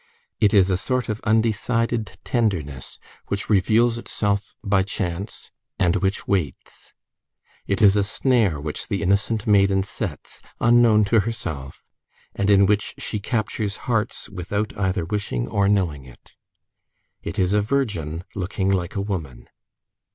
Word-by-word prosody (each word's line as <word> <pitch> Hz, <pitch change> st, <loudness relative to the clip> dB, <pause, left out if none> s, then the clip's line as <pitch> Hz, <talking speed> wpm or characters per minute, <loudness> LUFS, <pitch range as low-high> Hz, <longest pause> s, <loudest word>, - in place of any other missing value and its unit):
It 105 Hz, -, +4 dB
is 100 Hz, -3 st, +4 dB
a 90 Hz, -, +2 dB
sort 125 Hz, +2 st, -1 dB
of 110 Hz, 0 st, -3 dB
undecided 110 Hz, -2 st, 0 dB
tenderness 85 Hz, -, -2 dB, 0.3 s
which 100 Hz, +2 st, -3 dB
reveals 115 Hz, +4 st, +3 dB
itself 100 Hz, -3 st, -2 dB
by 100 Hz, -2 st, +3 dB
chance, 95 Hz, 0 st, -4 dB, 0.3 s
and 85 Hz, -2 st, +2 dB
which 95 Hz, +1 st, -1 dB
waits. 90 Hz, -7 st, -3 dB, 0.7 s
It 100 Hz, +2 st, +1 dB
is 100 Hz, -1 st, +7 dB
a 105 Hz, -, +3 dB
snare 105 Hz, -, +1 dB
which 75 Hz, +1 st, -4 dB
the -, -, -2 dB
innocent 100 Hz, +4 st, +1 dB
maiden 100 Hz, -2 st, +4 dB
sets 100 Hz, -, -6 dB, 0.2 s
unknown 115 Hz, -2 st, +5 dB
to 110 Hz, +2 st, +3 dB
herself, 85 Hz, -11 st, -5 dB, 0.5 s
and 100 Hz, 0 st, -1 dB
in 100 Hz, -1 st, +6 dB
which 105 Hz, +1 st, 0 dB
she 105 Hz, -, -4 dB
captures 105 Hz, -1 st, -2 dB
hearts 115 Hz, -3 st, -1 dB
without 100 Hz, +2 st, -3 dB
either 95 Hz, -3 st, -1 dB
wishing 85 Hz, -11 st, -2 dB
or 100 Hz, -1 st, +1 dB
knowing 85 Hz, -9 st, 0 dB
it. 60 Hz, -, -17 dB, 0.9 s
It -, -, -6 dB
is 95 Hz, -1 st, +2 dB
a 105 Hz, -, +4 dB
virgin 100 Hz, -, -2 dB
looking 95 Hz, 0 st, -1 dB
like 90 Hz, -1 st, -1 dB
a 100 Hz, -, 0 dB
woman. 85 Hz, -, -5 dB
100 Hz, 140 wpm, -23 LUFS, 95-110 Hz, 0.9 s, is